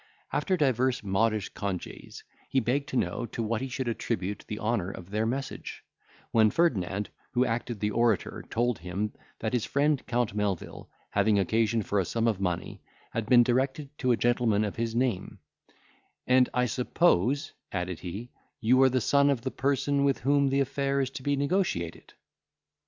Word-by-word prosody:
After 185 Hz, -2 st, +1 dB
divers 130 Hz, -4 st, +1 dB
modish 105 Hz, +1 st, +1 dB
congees, 100 Hz, -3 st, -6 dB, 0.3 s
he 135 Hz, -, +3 dB
begged 130 Hz, +4 st, -1 dB
to -, -, -5 dB
know 100 Hz, +3 st, -1 dB
to 115 Hz, -, -4 dB
what 115 Hz, +1 st, -1 dB
he 135 Hz, -, -2 dB
should 130 Hz, 0 st, -3 dB
attribute 100 Hz, -4 st, -2 dB
the 105 Hz, -, -4 dB
honour 105 Hz, -5 st, -1 dB
of 95 Hz, -1 st, -9 dB
their 110 Hz, +2 st, 0 dB
message; 135 Hz, +3 st, -4 dB, 0.5 s
when 110 Hz, -1 st, +5 dB
Ferdinand, 105 Hz, -, 0 dB, 0.2 s
who 125 Hz, 0 st, +3 dB
acted 115 Hz, -1 st, -2 dB
the 105 Hz, +1 st, 0 dB
orator, 115 Hz, -2 st, +1 dB
told 120 Hz, 0 st, 0 dB
him, 95 Hz, +5 st, -3 dB, 0.2 s
that 110 Hz, +2 st, -3 dB
his 120 Hz, -3 st, 0 dB
friend 145 Hz, 0 st, +1 dB
Count 120 Hz, -3 st, 0 dB
Melvil, 100 Hz, -4 st, -3 dB, 0.2 s
having 110 Hz, -2 st, +3 dB
occasion 110 Hz, +3 st, +2 dB
for 100 Hz, +1 st, 0 dB
a 95 Hz, -, +1 dB
sum 115 Hz, +6 st, 0 dB
of 105 Hz, -4 st, 0 dB
money, 90 Hz, -3 st, -2 dB, 0.3 s
had 115 Hz, -2 st, -3 dB
been 120 Hz, -1 st, +7 dB
directed 135 Hz, +4 st, -1 dB
to 130 Hz, -2 st, +2 dB
a 120 Hz, -, +3 dB
gentleman 120 Hz, -3 st, +2 dB
of 105 Hz, -, -3 dB
his 115 Hz, 0 st, -2 dB
name, 120 Hz, -6 st, -1 dB, 0.9 s
"and, 125 Hz, 0 st, +4 dB
I 125 Hz, 0 st, +2 dB
suppose," 130 Hz, -, +2 dB, 0.2 s
added 90 Hz, -2 st, -3 dB
he, 100 Hz, +7 st, -7 dB, 0.3 s
"you 125 Hz, +3 st, +4 dB
are 135 Hz, -, +7 dB
the 130 Hz, 0 st, +1 dB
son 140 Hz, +4 st, +4 dB
of 135 Hz, -4 st, +1 dB
the 130 Hz, -, -3 dB
person 140 Hz, +1 st, +1 dB
with 140 Hz, -1 st, +1 dB
whom 140 Hz, +2 st, +3 dB
the 135 Hz, +1 st, +2 dB
affair 140 Hz, +1 st, 0 dB
is 135 Hz, -1 st, 0 dB
to 135 Hz, -, -7 dB
be 145 Hz, +2 st, +1 dB
negotiated." 140 Hz, -, -1 dB
120 Hz, 175 wpm, -28 LUFS, 105-135 Hz, 0.9 s, been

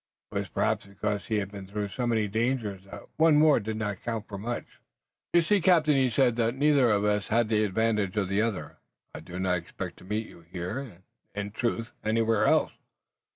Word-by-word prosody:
It -, -, -1 dB
was -, -, -5 dB
perhaps -, -, 0 dB
because 100 Hz, +1 st, -3 dB
he 110 Hz, -, 0 dB
had 100 Hz, -1 st, -2 dB
been 100 Hz, -2 st, -8 dB
through 100 Hz, +1 st, -3 dB
so 120 Hz, +5 st, -2 dB
many 110 Hz, -3 st, +1 dB
dangers 110 Hz, -3 st, -1 dB
that 100 Hz, -, -10 dB
one 160 Hz, -1 st, +5 dB
more 150 Hz, -3 st, +5 dB
did 110 Hz, 0 st, -4 dB
not 105 Hz, -3 st, -3 dB
count 115 Hz, -3 st, -4 dB
for 100 Hz, -3 st, -7 dB
much. 120 Hz, +4 st, -3 dB, 0.7 s
"You 170 Hz, -1 st, +5 dB
see, 200 Hz, +3 st, +2 dB
captain," 165 Hz, -4 st, +4 dB
he 135 Hz, -2 st, +3 dB
said, 120 Hz, 0 st, +2 dB
"that 115 Hz, +1 st, +1 dB
neither 140 Hz, -3 st, +4 dB
has 105 Hz, 0 st, +1 dB
the 110 Hz, -1 st, +2 dB
advantage 105 Hz, -1 st, 0 dB
of 100 Hz, -3 st, +1 dB
the 100 Hz, +2 st, +1 dB
other. 100 Hz, -10 st, -3 dB, 0.4 s
I -, -, -7 dB
did 90 Hz, +3 st, -8 dB
not 90 Hz, -1 st, +2 dB
expect 85 Hz, +1 st, -7 dB
to -, -, -15 dB
meet 105 Hz, +4 st, -2 dB
you 85 Hz, -, -14 dB
here, 90 Hz, +6 st, -5 dB
or 125 Hz, -10 st, -9 dB, 0.4 s
in 105 Hz, 0 st, -4 dB
truth, 115 Hz, 0 st, -2 dB
anywhere 110 Hz, 0 st, +2 dB
else. -, -, +3 dB
110 Hz, 200 wpm, -28 LUFS, 100-120 Hz, 0.7 s, one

